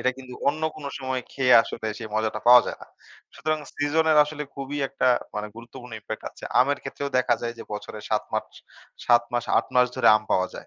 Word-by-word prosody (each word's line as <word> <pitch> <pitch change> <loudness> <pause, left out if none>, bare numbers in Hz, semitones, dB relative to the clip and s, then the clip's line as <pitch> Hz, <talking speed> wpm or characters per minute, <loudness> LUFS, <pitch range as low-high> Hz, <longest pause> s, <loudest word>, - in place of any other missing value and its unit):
এটা 130 - +2
কিন্তু 125 -1 -10
অন্য 155 +2 -2
কোন 155 - -10
সময়ে 130 -1 -3
খেয়ে 130 -2 +3
আসলে - - -6
সেই 110 - -7
মজাটা 110 0 -1
পাওয়া 125 0 +9
যায় - - -5
না। - - -11 0.5
সুতরাং 155 +1 -1 0.2
সিজনের 155 +2 +2
আসলে 150 0 -6
খুবই 140 +1 -5
একটা 135 - -1 0.3
মানে 105 0 -3
গুরুত্বপূর্ণ 120 +1 -11
impact 110 +1 -7
আছে। - - -12 0.2
আমের 140 +2 +2
ক্ষেত্রেও 140 0 -5
দেখা 120 -1 +3
যায় 115 0 -3
যে - - -6
বছরে 105 +1 -7
৭ 105 - +1
মার্চ - - -3 0.5
৭ 120 -1 +5
মাস 120 -1 0
৮ - - -1
মাস 125 0 +5
ধরে 130 -3 +4
আম 110 - -5
পাওয়া 95 0 +2
যায়। - - -9
125 Hz, 210 wpm, -25 LUFS, 115-140 Hz, 0.5 s, পাওয়া